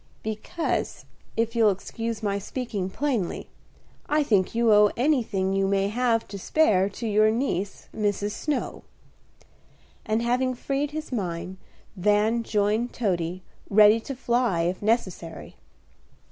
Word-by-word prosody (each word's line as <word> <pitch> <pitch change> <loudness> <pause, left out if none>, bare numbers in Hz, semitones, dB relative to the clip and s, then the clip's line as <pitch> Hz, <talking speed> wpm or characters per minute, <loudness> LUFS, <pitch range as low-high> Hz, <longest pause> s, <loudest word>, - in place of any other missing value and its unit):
"Because, 220 +10 -3 0.3
if 230 +1 0
you'll 225 -2 +5
excuse 225 +3 -4
my 200 -1 0
speaking 205 -3 -4
plainly, 240 -5 -2 0.6
I 300 0 +3
think 205 -6 +1
you 230 -2 +4
owe 210 0 +6
anything 230 -8 +1
you 195 0 +1
may 195 0 +1
have 230 0 +1
to 200 0 -6
spare 200 -6 +3
to 225 +4 -5
your 215 0 +4
niece, 215 -5 -2
Mrs. 205 -1 -1
Snow;" 290 +5 -3 1.2
and, 220 +2 0
having 255 +2 +1
freed 275 +3 -2
his 310 0 -6
mind, 185 -4 -3 0.4
Van 210 +4 +2
joined 215 +2 0
Toady, 180 -5 -2 0.3
ready 210 +2 +6
to 270 +4 -6
fly 240 -7 +1
if 175 +2 -1
necessary. 190 -7 -2
215 Hz, 130 wpm, -25 LUFS, 195-240 Hz, 1.2 s, owe